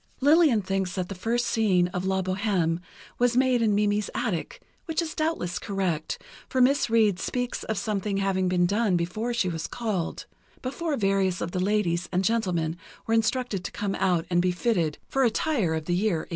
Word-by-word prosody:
Lillian 285 Hz, -, +5 dB
thinks 190 Hz, -1 st, -1 dB
that 185 Hz, -2 st, -3 dB
the -, -, -3 dB
first 230 Hz, +6 st, -1 dB
scene 205 Hz, -6 st, +2 dB
of 180 Hz, 0 st, -3 dB
"La 190 Hz, 0 st, +1 dB
Bohême" 185 Hz, -3 st, 0 dB, 0.4 s
was 245 Hz, 0 st, +3 dB
made 255 Hz, -2 st, +3 dB
in 215 Hz, -3 st, +3 dB
Mimi's 205 Hz, 0 st, +1 dB
attic, 235 Hz, -, -2 dB, 0.3 s
which 320 Hz, -3 st, -2 dB
is 330 Hz, -2 st, -1 dB
doubtless 310 Hz, -, -1 dB
correct, 185 Hz, -6 st, -2 dB, 0.3 s
for 260 Hz, -, 0 dB
Miss 265 Hz, +1 st, +4 dB
Reid 215 Hz, -5 st, +3 dB
speaks 245 Hz, +3 st, -2 dB
of 220 Hz, -, -2 dB
something 205 Hz, -1 st, -1 dB
having 195 Hz, -1 st, +1 dB
been 180 Hz, -1 st, +2 dB
done 200 Hz, 0 st, +2 dB
before 195 Hz, +8 st, -2 dB
she 235 Hz, -6 st, 0 dB
was 165 Hz, -2 st, -3 dB
called—before 250 Hz, -, -4 dB
various 195 Hz, -3 st, +1 dB
of 170 Hz, -, -3 dB
the 185 Hz, -, -2 dB
ladies 185 Hz, -3 st, 0 dB
and 185 Hz, +1 st, +1 dB
gentlemen 180 Hz, -7 st, 0 dB, 0.3 s
were 225 Hz, -, 0 dB
instructed 225 Hz, -3 st, 0 dB
to -, -, -5 dB
come 205 Hz, -1 st, -2 dB
out 180 Hz, -4 st, +1 dB
and 175 Hz, 0 st, +3 dB
be 180 Hz, 0 st, +2 dB
fitted 175 Hz, -5 st, 0 dB
for 270 Hz, -, +1 dB
attire 230 Hz, -, +1 dB
of 160 Hz, -1 st, -4 dB
the 175 Hz, -, 0 dB
year 180 Hz, -3 st, +1 dB
1830. -, -, -27 dB
195 Hz, 185 wpm, -26 LUFS, 180-235 Hz, 0.4 s, Lillian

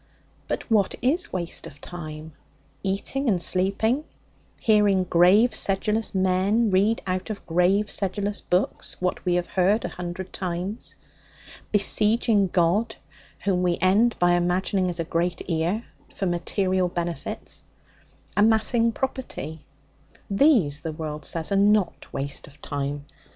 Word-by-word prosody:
But -, -, -4 dB
what 205 Hz, -3 st, +3 dB
is 310 Hz, +8 st, +1 dB
waste 175 Hz, -2 st, -3 dB
of 145 Hz, -, -13 dB
time? 155 Hz, -2 st, -8 dB, 0.5 s
Eating 200 Hz, +8 st, -1 dB
and 190 Hz, -4 st, +2 dB
sleeping; 200 Hz, -, +1 dB, 0.6 s
hearing 205 Hz, -4 st, +3 dB
grave, 185 Hz, +7 st, +4 dB
sedulous 210 Hz, +2 st, 0 dB
men 190 Hz, +4 st, +2 dB
read 205 Hz, +5 st, +2 dB
out 185 Hz, +1 st, -2 dB
of 210 Hz, -2 st, -6 dB
grave, 180 Hz, +5 st, +2 dB
sedulous 200 Hz, +1 st, -2 dB
book 180 Hz, +2 st, 0 dB, 0.2 s
what 180 Hz, 0 st, -2 dB
we 180 Hz, -1 st, +2 dB
have 175 Hz, 0 st, 0 dB
heard 195 Hz, +5 st, +1 dB
a -, -, -2 dB
hundred 180 Hz, +1 st, -6 dB
times; 185 Hz, +4 st, -4 dB, 0.8 s
besieging 210 Hz, 0 st, +3 dB
God 185 Hz, +6 st, +1 dB, 0.5 s
(whom 185 Hz, -3 st, +1 dB
we 175 Hz, -1 st, +1 dB
end 205 Hz, +6 st, +3 dB
by 175 Hz, 0 st, +3 dB
imagining 180 Hz, +2 st, +1 dB
as 175 Hz, -1 st, -4 dB
a -, -, +1 dB
great 170 Hz, +2 st, -2 dB
ear) 170 Hz, +7 st, -1 dB, 0.3 s
for 195 Hz, -, -2 dB
material 185 Hz, +1 st, 0 dB
benefits; 175 Hz, -1 st, -5 dB, 0.7 s
amassing 225 Hz, +2 st, +3 dB
property 220 Hz, -, -5 dB, 0.6 s
these, 195 Hz, -, +4 dB
the 160 Hz, 0 st, -5 dB
world 150 Hz, -2 st, -6 dB
says, 165 Hz, +1 st, -2 dB
are 200 Hz, -, +3 dB
not 205 Hz, -1 st, +2 dB
waste 140 Hz, +1 st, -4 dB
of 145 Hz, 0 st, -17 dB
time. 145 Hz, 0 st, -4 dB
185 Hz, 130 wpm, -25 LUFS, 175-210 Hz, 0.8 s, grave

